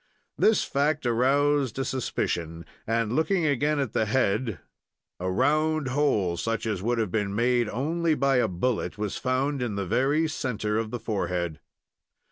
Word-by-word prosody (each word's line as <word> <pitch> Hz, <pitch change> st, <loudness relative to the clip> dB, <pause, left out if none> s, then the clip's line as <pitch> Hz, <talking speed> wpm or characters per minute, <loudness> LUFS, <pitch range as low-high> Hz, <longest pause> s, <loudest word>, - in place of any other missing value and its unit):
This 220 Hz, -, +3 dB
fact 145 Hz, +1 st, 0 dB
aroused 135 Hz, +2 st, +2 dB
a 135 Hz, -, -1 dB
suspicion, 85 Hz, -10 st, -2 dB, 0.2 s
and, 115 Hz, 0 st, 0 dB
looking 160 Hz, +4 st, +1 dB
again 145 Hz, +1 st, +1 dB
at 135 Hz, -6 st, -2 dB
the 110 Hz, -, +1 dB
head, 110 Hz, -3 st, +1 dB, 0.6 s
a 90 Hz, +1 st, -2 dB
round 155 Hz, +7 st, +1 dB
hole, 110 Hz, -11 st, +1 dB
such 115 Hz, +4 st, -2 dB
as 105 Hz, -5 st, -2 dB
would 120 Hz, +4 st, 0 dB
have 110 Hz, -5 st, -1 dB
been 100 Hz, -1 st, -1 dB
made 120 Hz, 0 st, +2 dB
only 160 Hz, +7 st, 0 dB
by 135 Hz, -1 st, +2 dB
a 125 Hz, -, +3 dB
bullet, 105 Hz, +4 st, -2 dB
was 105 Hz, -1 st, -3 dB
found 135 Hz, +2 st, -1 dB
in 120 Hz, -4 st, -2 dB
the 100 Hz, -1 st, -2 dB
very 135 Hz, -, +2 dB
centre 110 Hz, -7 st, -2 dB
of 115 Hz, -1 st, -3 dB
the 120 Hz, -, -4 dB
forehead. 90 Hz, -7 st, -2 dB
125 Hz, 160 wpm, -26 LUFS, 105-140 Hz, 0.6 s, This